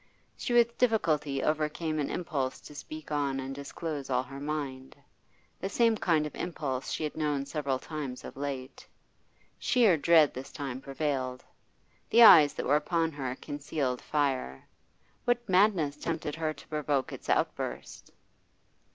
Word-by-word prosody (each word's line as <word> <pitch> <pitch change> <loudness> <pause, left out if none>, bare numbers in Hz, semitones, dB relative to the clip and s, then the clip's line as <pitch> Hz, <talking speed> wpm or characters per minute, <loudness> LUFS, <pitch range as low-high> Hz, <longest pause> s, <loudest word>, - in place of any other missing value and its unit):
She - - -4
with 235 -1 +3
difficulty 155 - +1
overcame 155 +1 -1
an 145 - -1
impulse 145 -7 -2
to - - -12
speak 155 +1 -9
on 140 -2 0
and 135 0 -5
disclose 140 +1 -5
all 125 -1 +1
her 135 +1 -9
mind, 140 -3 -4 0.6
the 195 - -3
same 230 +2 +3
kind 165 -7 +1
of 150 - -6
impulse 140 -7 -3
she - - -2
had 150 - -3
known 150 -3 -1
several 140 -2 -1
times 140 -3 -6
of - - -9
late. 135 -1 -6 0.7
Sheer 225 -9 +4
dread 155 0 +5
this 130 +2 -8
time 135 -2 -5
prevailed. 135 -3 -3 0.6
The 235 +1 +7
eyes 155 -9 +9
that - - -3
were 145 - +4
upon 165 +2 0
her 130 -4 -4
concealed 145 -3 -3
fire; 135 - -1 0.6
what 245 0 +1
madness 185 -7 +3
tempted 150 - -3
her 160 0 -1
to 145 - -12
provoke 145 -3 -1
its - - -9
outburst? - - -2
150 Hz, 150 wpm, -29 LUFS, 135-160 Hz, 0.7 s, eyes